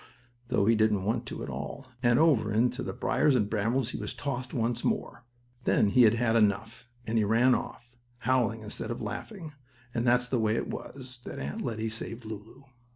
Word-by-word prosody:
though 100 - +2
he 115 - +5
didn't 110 -3 +2
want 115 +4 -1
to - - -5
at - - -6
all, 70 - -6 0.2
and 120 -2 +4
over 140 -9 +4
into 120 +4 +1
the - - -3
briars 150 -3 +2
and 105 -4 +1
brambles 115 +4 0
he - - -5
was - - -4
tossed 130 -2 -4
once 115 0 -1
more. 120 - -2 0.4
Then 105 - +3
he 125 +3 +6
had 110 +1 +5
had 115 -1 +1
enough, 110 +3 +1 0.2
and 115 0 +1
he - - +3
ran 115 +5 +4
off, 120 -1 -4 0.3
howling 120 -3 +1
instead 105 0 -5
of 120 - -3
laughing, 155 - -6 0.4
and 115 - 0
that's 125 0 +3
the 125 -1 0
way 110 0 +2
it - - -2
was 130 -2 -8
that - - -6
Aunt 70 +2 -4
Lettie 110 -2 -2
saved 115 +1 -6
Lulu. 110 +4 -9
115 Hz, 200 wpm, -29 LUFS, 110-125 Hz, 0.4 s, he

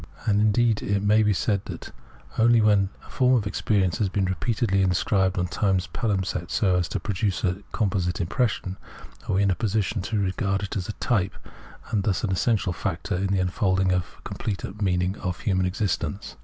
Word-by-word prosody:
And, 105 -1 +3
indeed, 110 +1 +3
it 100 0 0
may 105 +2 +4
be 105 -1 +3
said 100 0 +1
that - - -8 0.5
only 115 +1 +5
when 105 -3 +4 0.2
a - - -15
form 130 0 +3
of 110 -4 +1
experience 100 -3 0
has 100 -3 +1
been 95 0 0
repeatedly 95 +2 0
in 90 -1 +2
sc]?ibed 95 +2 +2
upon 90 -1 -1
time's 95 0 0
pahmpsest 95 -6 -2
so 95 -4 +2
as 90 -2 +1
to 100 - -2
produce 95 +1 -1
a 95 +1 0
composite 90 -4 0
impression, 95 0 -1 0.5
are - - +1
we 100 - +3
in 100 - +3
a - - +1
position 105 +1 -1
to 110 +4 -2
regard 95 0 0
it 100 - -4
as 95 -1 -3
a - - -2
type, 105 -6 0 0.6
and 105 - +1
thus 100 -2 0
an 105 - 0
essential 95 -1 +1
factor 90 +1 -3
in 95 +2 0
the 95 0 +1
unfolding 95 0 +1
of 90 -2 -2
the - - -22
complete 105 0 -5
meaning 90 0 +1
of 90 -2 -4
human 95 -3 +1
experience. 95 -2 -2
100 Hz, 195 wpm, -25 LUFS, 90-105 Hz, 0.6 s, only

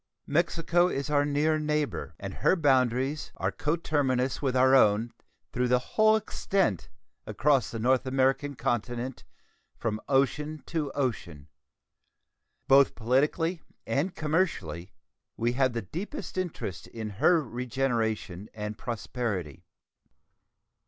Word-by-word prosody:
Mexico 170 +2 +2
is 140 -3 -3
our 145 -1 +3
near 150 +2 +1
neighbor, 150 -1 -2
and - - -6
her - - +2
boundaries 135 -2 +1
are - - -1
coterminous 145 -5 0
with 130 -3 0
our 130 +1 +5
own 115 -2 +4 0.4
through 125 0 +1
the 125 0 +4 0.2
whole 215 0 +5
extent 195 - -1 0.4
across 135 -2 +2
the 115 - -5
North 130 +3 +2
American 135 +2 +1
continent, 120 0 -2 0.5
from 110 -2 -2
ocean 145 +3 +1
to 155 -4 -2
ocean. 95 - -3 1.2
Both 135 0 +5
politically 150 +8 +1 0.2
and 165 +7 -1
commercially 145 - -1 0.5
we 120 +1 +1
have 130 0 +1
the 115 -2 -3
deepest 185 - -6
interest 175 - -4
in 110 -2 -6
her 175 -2 +5
regeneration 115 -6 -2
and 105 0 -5
prosperity. 110 - -4
130 Hz, 115 wpm, -28 LUFS, 115-150 Hz, 1.2 s, our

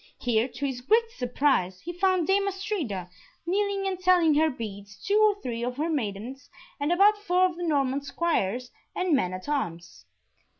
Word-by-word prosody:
Here, 235 -1 +1
to 255 +2 -5
his 260 -3 -3
great 455 - +2
surprise, 245 - 0
he 345 - -6
found 370 -1 +2
Dame 395 +3 +2
Astrida, 375 - -3 0.4
kneeling 395 +2 0
and 380 -2 -2
telling 360 -4 +4
her 315 +2 +3
beads, 205 -6 -8
two 410 +2 +3
or 420 -1 +4
three 235 -2 -3
of 250 +1 -3
her 315 +3 -1
maidens, 245 0 -4 0.3
and 290 +3 0
about 410 +4 +5
four 370 -2 +2
of 365 -2 -1
the 350 0 -4
Norman 280 -2 +1
Squires 250 - -1 0.2
and 365 -4 +2
men 185 -9 0
at 185 0 -7
arms. 175 - -4
295 Hz, 175 wpm, -27 LUFS, 240-370 Hz, 0.4 s, about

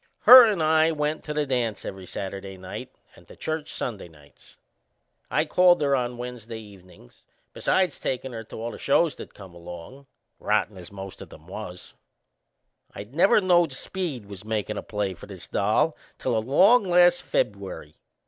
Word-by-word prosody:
Her 255 -1 +11
and 200 -7 0
I 160 +1 +4
went 150 0 -2
to 150 - -4
the 150 -1 +1
dance 120 -6 -2
every 95 -1 -7
Saturday 95 0 -6
night 95 0 -8 0.3
and - - -19
to - - -14
church 155 -1 -4
Sunday 105 -7 -5
nights. 75 -3 -21 0.7
I 155 - +1
called 175 0 +4
on 140 - +1 0.2
her 125 - -10
Wednesday 120 -2 -7
evenin's, 95 - -16 0.3
besides 185 -5 0
takin' 130 0 -3
her 115 -1 -6
to - - -11
all 115 +1 -4
the - - -10
shows 155 +2 +2
that - - -11
come 95 -3 -12
along 85 +10 -11 0.3
rotten 105 - 0
as 90 -2 -10
the 100 - -16
most 95 -1 -9
o' - - -7
them 80 - -16
was. 90 -1 -9 1.0
I - - -6
never 170 - +3
knowed 175 -5 +3
Speed 150 - -4
was 100 -1 -10
makin' 105 -1 -3
a - - -4
play 105 -3 -3
for - - -13
this - - -10
doll 110 +10 +1 0.2
till 125 -3 -1
along 185 - +4
last 175 -1 +4
Feb'uary. - - -3
120 Hz, 175 wpm, -25 LUFS, 100-160 Hz, 1.0 s, Her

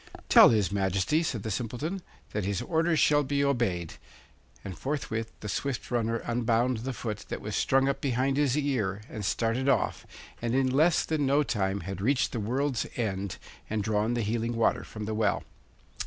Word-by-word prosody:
'Tell - - +9
his 105 -4 +2
Majesty,' 100 - +1
said 120 -11 -2
the 110 - -3
Simpleton, 125 - -3 0.3
'that 105 - -2
his 100 0 -1
orders 165 0 +1
shall 145 0 +4
be 140 0 0
obeyed; 115 - 0 0.7
'and 95 - -5
forthwith 115 - -3
the 105 - -5
swift 135 +5 -3
runner 115 -1 +1
unbound 120 +1 +1
the 125 +4 -4
foot 110 -4 -5
that - - -3
was 105 0 -5
strung 135 0 +3
up 140 - -1
behind 135 0 +1
his 145 -1 +2
ear 110 -9 -1
and 105 - -5
started 115 +6 0
off, 130 -5 0 0.3
and 120 +1 0
in 130 -1 +2
less 155 +5 +3
than 150 -3 0
no 140 +2 +4
time 100 -6 -1
had 95 +2 -6
reached 130 +5 +2
the 120 - -3
world's 130 +4 -1
end 100 -5 -2 0.3
and 110 -1 -1
drawn 110 +3 0
the 120 - 0
healing 115 +2 -1
water 115 - +2
from 105 -1 -7
the 110 - -3
well. 105 -1 +1
115 Hz, 185 wpm, -28 LUFS, 105-135 Hz, 0.7 s, Tell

